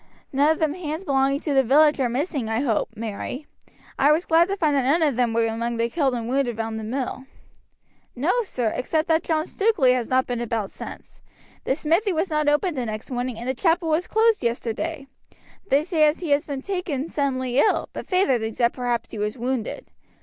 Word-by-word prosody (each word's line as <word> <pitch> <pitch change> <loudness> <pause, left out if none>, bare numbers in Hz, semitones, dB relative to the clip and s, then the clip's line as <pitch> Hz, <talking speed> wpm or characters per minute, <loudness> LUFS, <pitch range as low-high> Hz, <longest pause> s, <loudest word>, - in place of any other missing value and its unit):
"None 285 +3 +4
of 320 - +2
the 310 -1 0
hands 320 -1 -4
belonging 275 0 +1
to 295 - -1
the 270 - +5
village 295 +4 +4
are 255 -2 +1
missing, 270 -1 -2
I 225 +2 0
hope, 235 -6 0
Mary. 230 +6 -5 0.5
I 285 +2 +5
was 320 +4 +2
glad 335 +1 +4
to 395 - -1
find 310 -5 +2
that 275 - +3
none 290 +6 +2
of 290 -5 +2
them 240 -1 +1
were 230 0 +2
among 230 +1 -2
the 230 0 0
killed 275 -6 +1
and 230 -1 -4
wounded 250 -3 0
round 225 0 -3
the - - -6
mill." 255 +3 -4 0.9
"No, 285 +8 +1
sir, 245 - -2
except 310 +6 -1
that 320 0 +3
John 315 -1 0
Stukeley 380 - +2
has 245 -2 -2
not 260 0 +2
been 245 -1 -3
about 225 -4 -2
since. - - -10 0.4
The 265 - +1
smithy 335 +7 +1
was 330 +2 -1
not 305 -1 +1
opened 300 +2 +1
the 245 - -2
next 215 +3 -6
morning 245 -1 -3
and 235 +2 -6
the 260 - +1
chapel 330 +3 +1
was 320 +3 +1
closed 445 - +2
yesterday. 245 +6 -2 0.6
They 280 -1 +3
say 320 -2 +3
as 300 - 0
he 330 -5 -3
has 285 +3 +2
been 275 -2 -4
taken 345 -7 -3
suddenly 260 -4 -1
ill, 425 - +2
but - - -7
feyther 365 -10 +2
thinks 220 0 -4
that 235 -1 +2
perhaps 245 -2 -2
he 215 - -6
was 210 +3 -2
wounded. 250 - -3
275 Hz, 215 wpm, -23 LUFS, 240-315 Hz, 0.9 s, the